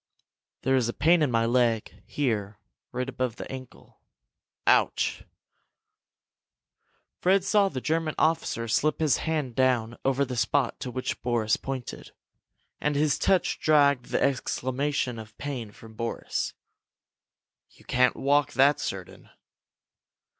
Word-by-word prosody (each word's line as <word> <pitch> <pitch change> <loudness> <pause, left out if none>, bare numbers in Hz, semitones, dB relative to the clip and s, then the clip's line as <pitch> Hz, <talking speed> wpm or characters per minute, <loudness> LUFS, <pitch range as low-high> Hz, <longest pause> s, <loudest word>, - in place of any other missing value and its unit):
"There 135 - +3
is 120 -3 +1
a - - -2
pain 170 +1 +4
in 150 - +3
my 115 -1 +2
leg 115 -2 +1
here, 110 -7 -2 0.3
right 125 +1 -3
above 130 -3 -2
the - - -7
ankle. 130 -1 -11 0.7
Ouch!" - - +2 1.9
Fred 190 +1 +3
saw 200 0 +3
the 130 -6 -5
German 160 +1 -1
officer 155 -7 0
slip 145 +6 +1
his 155 -4 +3
hand 155 -6 -2
down 120 -3 +1
over 135 +1 +2
the 125 -1 -5
spot 120 +4 0
to 130 - -5
which 130 +1 -4
Boris 115 -3 +1
pointed, 135 -2 -6 0.7
and 150 0 0
his 150 0 +2
touch 190 -2 +2
dragged 140 -5 +4
the - - -1
exclamation 130 -1 -1
of 110 0 -12
pain 130 -7 -5
from 110 +2 -14
Boris. 115 +1 -3 1.1
"You - - -22
can't 125 -1 +3
walk, 145 0 +2
that's 140 +2 +4
certain!" 95 -2 -6
130 Hz, 130 wpm, -27 LUFS, 120-145 Hz, 1.9 s, pain